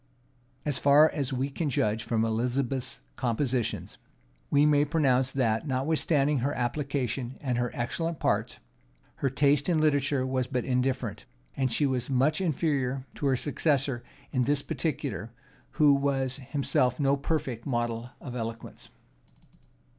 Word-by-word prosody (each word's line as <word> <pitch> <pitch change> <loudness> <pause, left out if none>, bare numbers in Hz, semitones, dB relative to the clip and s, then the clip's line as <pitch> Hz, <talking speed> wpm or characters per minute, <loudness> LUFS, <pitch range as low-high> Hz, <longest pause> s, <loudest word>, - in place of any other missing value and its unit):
As 145 -3 0
far 145 +3 +6
us 140 -2 -2
we 135 +2 -1
can 155 +2 -2
judge 110 -3 0
from 115 -1 +1
Elizabeth's 125 +3 -1 0.2
compositions, 125 -1 -1 0.5
we 145 +1 +4
may 145 -1 +4
pronounce 135 -4 +2
that, 120 0 0
notwithstanding 145 +1 +1
her 140 +4 -1
application, 130 -1 -2
and 125 -4 -1
her 120 0 0
excellent 165 +6 -2
parts, - - 0 0.6
her 135 - 0
taste 145 +3 +2
in 165 -3 +3
literature 145 -3 +2
was 130 -1 -1
but 125 -2 -2
indifferent: 130 0 -1 0.4
she 130 +5 +1
was 130 -2 -1
much 140 +6 +2
inferior 140 -6 0
to 145 - -2
her 135 - +3
successor 140 -3 0 0.3
in 130 - +1
this 140 +3 +1
particular, 140 -8 -3 0.4
who 150 -2 +5
was 135 -1 0
himself 130 -2 0
no 140 -1 +3
perfect 140 -5 -3
model 120 -2 -2
of 125 -3 -7
eloquence. 115 -1 -6
135 Hz, 135 wpm, -28 LUFS, 125-145 Hz, 0.6 s, far